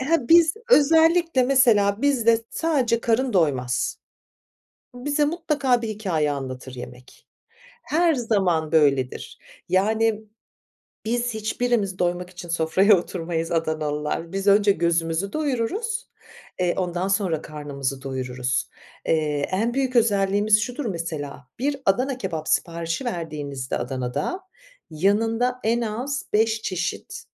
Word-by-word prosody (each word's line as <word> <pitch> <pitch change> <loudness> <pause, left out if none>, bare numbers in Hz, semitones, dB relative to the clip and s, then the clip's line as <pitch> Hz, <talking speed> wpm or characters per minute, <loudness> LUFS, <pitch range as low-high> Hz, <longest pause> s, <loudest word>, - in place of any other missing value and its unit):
he, 280 -1 0
biz 330 -1 +6 0.2
özellikle 325 - +5
mesela 230 -5 +3
bizde 230 -5 +3
sadece 260 -8 0
karın 235 +2 +1
doymaz. 135 -9 0 1.0
Bize 290 +4 0
mutlaka 290 -6 0
bir 225 - -3
hikâye 185 -9 -1
anlatır 130 -2 -6
yemek. 125 0 -11 0.6
Her 335 +1 +2
zaman 190 - 0
böyledir. 140 -5 +1 0.3
Yani, 220 +4 +1 0.8
biz 240 +1 -1
hiçbirimiz 215 -3 -1
doymak 180 0 -1
için 175 -1 -10
sofraya 170 +5 +4
oturmayız 165 -2 -3
Adanalılar. 155 0 -2
Biz 195 +1 -3
önce 200 0 +5
gözümüzü 170 +2 0
doyururuz, 315 - -2 0.5
eee, 180 -1 +1
ondan 180 0 -1
sonra 190 -6 0
karnımızı 140 -3 -5
doyururuz. 130 -2 -2 0.4
Eee, 150 -3 0
en 225 +5 0
büyük 260 -2 0
özelliğimiz 205 -1 +3
şudur 245 +5 -4
mesela, 155 -7 -5
bir 280 +3 0
Adana 255 +7 +1
kebap 160 -10 -4
siparişi 170 +6 -1
verdiğinizde 150 - -4
Adana'da, 125 - -3 0.5
yanında 225 +9 +1
en 230 +2 +2
az 245 +5 -3
beş 220 +1 +2
çeşit, 180 -2 -4
200 Hz, 110 wpm, -23 LUFS, 160-245 Hz, 1.0 s, biz